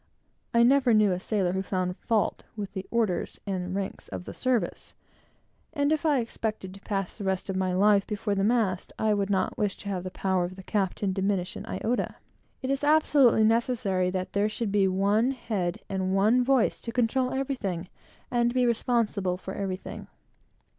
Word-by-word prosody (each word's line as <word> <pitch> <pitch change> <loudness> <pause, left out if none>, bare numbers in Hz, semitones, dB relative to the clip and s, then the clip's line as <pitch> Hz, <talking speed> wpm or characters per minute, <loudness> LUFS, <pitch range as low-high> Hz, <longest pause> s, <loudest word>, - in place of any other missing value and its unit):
I 235 0 +5
never 255 -2 +5
knew 210 -2 +4
a 180 - -1
sailor 190 -2 0
who 190 +1 -1
found 185 -1 -2
fault 220 +1 0
with 205 -2 -5
the 190 -1 -5
orders 220 -6 -1
and 185 -2 -3
ranks 195 -1 -4
of 90 -2 -7
the - - -7
service; 255 -3 -1 0.8
and 285 -1 +1
if 315 +1 +1
I 295 -2 +4
expected 215 -4 -4
to 195 - -13
pass 195 -3 -3
the 210 - -7
rest 190 0 -1
of - - -4
my 185 -1 0
life 200 +1 +4
before 210 -1 -2
the 195 -1 0
mast, 210 -5 +1
I 215 -1 +2
would 200 -1 0
not 195 -2 0
wish 205 -2 0
to 200 - -7
have 185 -3 -2
the 185 - -4
power 190 -1 0
of 180 +1 -4
the 190 - -11
captain 195 -1 -1
diminished 190 -1 -1
an - - -7
iota. 240 +2 -2 0.5
It 260 - -1
is 275 +1 -1
absolutely 290 -6 +5
necessary 220 -5 +1
that 185 0 -3
there 205 +1 +2
should 215 -1 -3
be 200 -1 +3
one 200 +5 +2
head 200 -8 -2
and 190 -1 -1
one 220 +6 +4
voice, 260 -2 +2
to 230 - -5
control 250 +2 +1
everything, 245 -11 -2 0.4
and 240 0 +1
be 250 -1 +3
responsible 220 -6 +1
for 190 +1 -7
everything. 195 -2 -5
205 Hz, 190 wpm, -27 LUFS, 190-235 Hz, 0.8 s, I